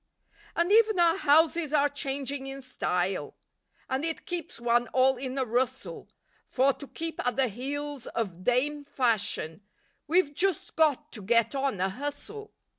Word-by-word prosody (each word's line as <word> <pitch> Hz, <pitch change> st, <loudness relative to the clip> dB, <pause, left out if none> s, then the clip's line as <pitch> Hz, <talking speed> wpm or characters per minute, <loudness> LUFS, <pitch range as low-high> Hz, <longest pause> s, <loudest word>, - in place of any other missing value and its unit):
And 340 Hz, +3 st, +1 dB
even 435 Hz, -2 st, +5 dB
our 335 Hz, -1 st, +5 dB
houses 315 Hz, -1 st, +3 dB
are 290 Hz, -1 st, +4 dB
changing 275 Hz, -1 st, -3 dB
in 270 Hz, 0 st, -7 dB
style, 180 Hz, -, -2 dB, 0.5 s
And 265 Hz, +2 st, -1 dB
it 325 Hz, 0 st, -3 dB
keeps 345 Hz, -8 st, -5 dB
one 240 Hz, 0 st, +2 dB
all 260 Hz, +1 st, +4 dB
in 260 Hz, +1 st, -5 dB
a 265 Hz, -, +1 dB
rustle, 245 Hz, +2 st, -2 dB, 0.4 s
For, 270 Hz, +2 st, +3 dB
to 280 Hz, -, -11 dB
keep 325 Hz, +2 st, -5 dB
at 245 Hz, -2 st, 0 dB
the 265 Hz, 0 st, +2 dB
heels 280 Hz, +4 st, -5 dB
of 185 Hz, -6 st, -4 dB
"Dame 285 Hz, +6 st, +1 dB
Fashion," 220 Hz, -, -1 dB, 0.5 s
We've 320 Hz, -2 st, +3 dB
just 375 Hz, +2 st, -1 dB
got 310 Hz, -4 st, +2 dB
to 215 Hz, -, -8 dB
"get 230 Hz, +4 st, +2 dB
on 270 Hz, -7 st, -1 dB
a 190 Hz, +1 st, +1 dB
hustle." 290 Hz, -, -6 dB
275 Hz, 155 wpm, -28 LUFS, 240-300 Hz, 0.5 s, even